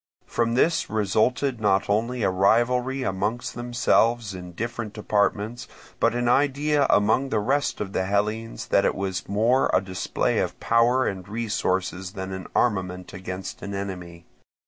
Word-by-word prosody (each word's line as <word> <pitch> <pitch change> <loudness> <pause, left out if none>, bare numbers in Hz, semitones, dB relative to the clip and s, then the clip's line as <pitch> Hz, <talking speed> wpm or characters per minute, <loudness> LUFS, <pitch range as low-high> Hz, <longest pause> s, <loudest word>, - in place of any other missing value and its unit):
From 115 0 0
this 160 +6 +2
resulted 110 +5 +1
not 95 -2 +2
only 115 +3 0
a 95 - +2
rivalry 125 +7 +2
among 105 +3 -1
themselves 120 -2 +1
in 90 -1 -7
their 90 - -11
different 115 -1 -4
departments, 105 +2 -1 0.3
but - - +2
an 120 0 0
idea 145 +3 +2
among 110 +6 +3
the 110 - 0
rest 135 +7 0
of 100 -2 -4
the 95 - 0
Hellenes 105 +3 -2
that - - +4
it - - +1
was 95 -1 -3
more 115 +6 +2
a - - +5
display 95 -1 -1
of - - -2
power 120 +3 +3
and 95 -1 -4
resources 95 -4 -2
than 95 -2 -5
an 95 -1 -6
armament 90 -5 0
against 95 +1 -6
an 100 0 -5
enemy. 90 -3 -6
110 Hz, 155 wpm, -25 LUFS, 95-120 Hz, 0.3 s, a